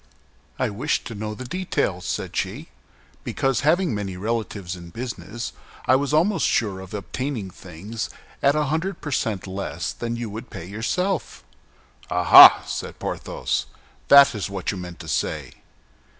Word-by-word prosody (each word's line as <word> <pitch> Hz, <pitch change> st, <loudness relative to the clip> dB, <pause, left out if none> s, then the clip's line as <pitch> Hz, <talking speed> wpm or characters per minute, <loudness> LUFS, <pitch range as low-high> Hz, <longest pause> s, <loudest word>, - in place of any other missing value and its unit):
"I -, -, 0 dB
wished 130 Hz, +9 st, -1 dB
to 115 Hz, -, -6 dB
know 105 Hz, 0 st, -5 dB
the 130 Hz, -, -7 dB
detail," 130 Hz, -, -1 dB
said -, -, -4 dB
she, -, -, -3 dB, 0.5 s
"because, 135 Hz, -4 st, 0 dB
having 165 Hz, +3 st, +2 dB
many 100 Hz, -3 st, -4 dB
relatives 105 Hz, -3 st, -3 dB
in 85 Hz, -1 st, -11 dB
business, 115 Hz, +1 st, -6 dB, 0.3 s
I 130 Hz, -, +5 dB
was 140 Hz, +1 st, 0 dB
almost 175 Hz, +7 st, +3 dB
sure 100 Hz, -5 st, 0 dB
of 95 Hz, +2 st, -8 dB
obtaining 110 Hz, 0 st, -4 dB
things 95 Hz, +6 st, -7 dB, 0.3 s
at 140 Hz, +1 st, +4 dB
a 150 Hz, -, +2 dB
hundred 160 Hz, +7 st, -2 dB
per 145 Hz, -, -6 dB
cent 110 Hz, -7 st, -1 dB
less 95 Hz, +1 st, -4 dB
than 120 Hz, 0 st, -4 dB
you 120 Hz, 0 st, -4 dB
would 115 Hz, +4 st, -7 dB
pay 95 Hz, -6 st, -8 dB
yourself." 150 Hz, -, -2 dB, 0.7 s
"Ah, 90 Hz, 0 st, -1 dB
ah!" -, -, +11 dB
said -, -, -5 dB
Porthos, -, -, -3 dB, 0.4 s
"that 140 Hz, -1 st, +8 dB
is 105 Hz, -3 st, -3 dB
what 95 Hz, -3 st, -2 dB
you 100 Hz, -, -6 dB
meant 90 Hz, -1 st, -7 dB
to 80 Hz, -, -10 dB
say!" 75 Hz, -, -2 dB
110 Hz, 160 wpm, -23 LUFS, 95-140 Hz, 0.7 s, ah